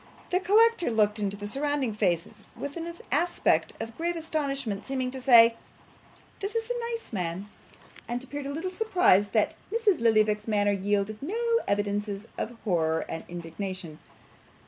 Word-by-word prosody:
The 365 - +3
collector 420 - +4
looked 215 -2 +2
into 200 -1 -2
the 205 - -6
surrounding 275 +1 -1
faces 180 -5 -2
with 285 0 -5
an 335 0 -4 0.2
aspect 335 +6 +2
of 225 0 -6
grave 345 +1 -1
astonishment, 275 -10 -2
seeming 260 -2 -2
to 260 0 -6
say, 235 -3 +7 0.8
'This 405 +3 -4
is 455 +1 -1
a 475 -1 -2
nice 460 - -6
man!' 180 +1 -3 0.6
and 240 +1 -3
appeared 285 +1 -6
a - - -3
little 330 +6 -3
surprised 365 - +3
that - - +2 0.2
Mrs. 435 -5 +2
Lillyvick's 215 -2 +3
manner 205 -2 +2
yielded 200 +2 -1
no 360 +11 -3 0.3
evidences 205 +1 -1
of 235 +1 -4
horror 160 -5 +1
and 165 - -5
indignation. 175 -1 -6
230 Hz, 150 wpm, -28 LUFS, 205-325 Hz, 0.8 s, say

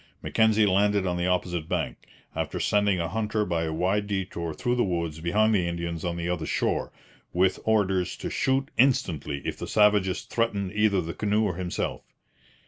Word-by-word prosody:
Mackenzie 110 -1 +3
landed 100 0 +2
on 90 -1 0
the 90 +1 0
opposite 90 -3 -1
bank, - - -3 0.3
after - - -2
sending 105 -3 +2
a 85 - -1
hunter 105 +3 -1
by 85 -3 -1
a 80 - -2
wide 95 +6 0
detour 95 -4 -3
through 120 +10 -1
the 125 -1 +2
woods 85 -4 -2
behind 105 +7 +2
the 90 -4 +2
Indians 85 -1 -4
on 85 -1 -2
the 85 0 -3
other 85 -3 -2
shore, - - -1 0.4
with 95 +1 +2
orders 95 -4 +1
to - - -5
shoot 135 +1 0
instantly 85 - +1
if - - -3
the - - -5
savages 105 -3 +3
threatened 100 -5 -1
either 105 -2 +2
the 85 0 -5
canoe 105 +1 +1
or 100 -4 0
himself. 90 -1 -3
95 Hz, 180 wpm, -26 LUFS, 85-105 Hz, 0.4 s, Mackenzie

